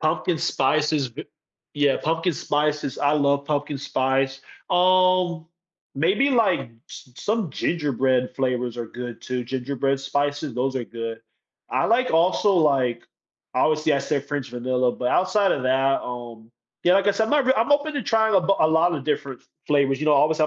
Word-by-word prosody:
Pumpkin 160 +2 0
spices 150 0 +1
b 135 +7 -9 0.5
yeah, 145 -2 +2
pumpkin 165 +2 0
spices 150 -1 -1
I 145 0 +2
love 140 -1 +1
pumpkin 145 -1 -2
spice. 135 0 -1 0.3
Um, 185 -2 +2 0.5
maybe, 190 - +2
like, 220 -8 +2 0.3
s - - -11
some 215 0 -1
gingerbread 130 -6 0
flavors 125 -2 -1
are 120 -1 -4
good 120 +1 -8
too. 125 -1 -3
Gingerbread 135 +2 -2
spices, 145 0 -2
those 130 +2 -1
are 125 - -3
good. 115 -1 -6 0.5
I 130 +3 0
like 250 +3 +2
also, 180 +5 +3
like 135 -8 +2 0.5
obviously 155 +4 +2
I 140 - +2
said 140 0 -2
French 145 -4 -4
vanilla, 125 0 0
but 125 - -2
outside 190 +5 +2
of 135 - -2
that, 135 +1 +2
um, 120 -2 -8 0.3
yeah, 180 - +5
like 195 +1 +2
I - - +6
said, 220 +2 0
my 295 - +4
r 260 0 +3
I'm 230 +6 +2
open 295 +1 +1
to 285 - -2
trying 220 -1 +2
a 190 - +5
b 190 +3 +1
lot 160 +2 +2
of 140 -4 -5
different 140 -3 -3
f - - -31 0.2
flavors, 140 -2 +2
you - - -1
know, 150 - +5
obviously, 155 +2 +3
145 Hz, 175 wpm, -23 LUFS, 130-175 Hz, 0.5 s, I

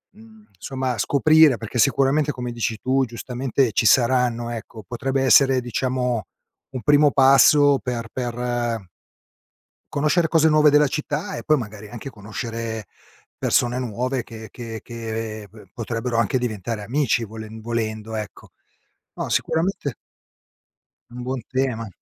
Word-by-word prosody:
mhmm, 220 -1 -18
somma, 130 0 -3
scoprire 155 +3 +5
perché 115 +2 -5
sicuramente, 140 +3 +3
come 125 -1 -5
dici 115 -2 -2
tu, 135 +1 +2
giustamente, 125 +1 -1
ci - - +1
saranno, 120 0 +3
ecco, 115 -1 -8
potrebbe 135 +4 -1
essere 130 +1 +5
diciamo 125 -2 -1 0.5
un 130 -2 -5
primo 145 +1 +4
passo 140 +1 +6
per 120 -2 -4
per 120 -3 -2 1.1
conoscere 155 +4 +2
cose 160 0 +4
nuove 150 -1 +5
della 150 0 +4
città 155 +7 -3
e - - -7
poi 155 - +4
magari, 110 -4 -7
anche 120 +4 -8
conoscere 110 0 -6 0.5
persone 120 +1 +1
nuove 125 +1 -2
che 110 -1 -10
che 115 -2 -7
che, 115 -2 -5
ehm, - - -11
b 105 -3 -16
potrebbero 115 +1 -3
anche 115 +3 +1
diventare 110 -2 -3
amici 120 +1 0
volen 110 0 -9
volendo 110 -1 -3
ecco. 105 -2 -7 0.7
No, - - -4
sicuramente 160 - -1 1.2
un 125 +1 -8
buon 130 0 -3
tema. 125 -4 -1
125 Hz, 135 wpm, -22 LUFS, 115-135 Hz, 1.2 s, passo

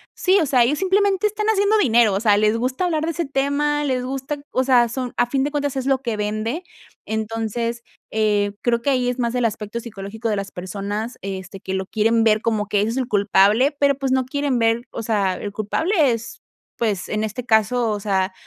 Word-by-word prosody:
sí, 380 +2 +3
o - - +2
sea, 255 -3 +4
ellos 285 +5 +1
simplemente 390 +1 +2
están 425 0 -3
haciendo 405 +1 +3
dinero, 235 - +4
o 195 - 0
sea, 210 -1 +4
les 215 +1 +2
gusta 255 +9 -1
hablar 320 -3 0
de 335 - -1
ese 340 +1 -2
tema, 285 +2 0
les 260 -3 -1
gusta, 270 +3 -4
o 255 - +1
sea, 245 -3 +4
son 250 +1 -4
a 240 - +3
fin 265 +2 0
de 290 - -1
cuentas 285 -2 -2
es 260 - -2
lo 270 -1 +2
que 235 -5 -3
vende. 215 - -2 0.4
Entonces, 225 +2 -3 0.3
eh, 210 -2 +1
creo 235 -1 +1
que 280 - 0
ahí 255 -2 +1
es 250 +1 -3
más 235 -1 0
del 250 -1 +1
aspecto 215 0 -3
psicológico 220 0 -6
de 210 - +1
las 195 0 -4
personas, 205 +5 -5
este, 190 0 -6
que 190 - -5
lo 190 0 -2
quieren 225 +3 +2
ver 215 -1 +3
como 220 -2 0
que 205 -1 +1
ese 210 - 0
es 240 - -4
el 260 -2 -1
culpable, 210 +5 +3
pero 280 -1 +3
pues 270 -2 -2
no 260 -1 +2
quieren 280 0 -1
ver, 230 0 +2
o 230 - -5
sea, 200 -4 0
el 205 - -5
culpable 215 - -1 0.2
es, 230 +1 -7 0.4
pues, 210 -5 -1
en 215 0 -1
este 220 +3 -4
caso, 225 +1 +2
o 210 - -2
sea, 190 -2 0
235 Hz, 225 wpm, -21 LUFS, 210-270 Hz, 0.4 s, sea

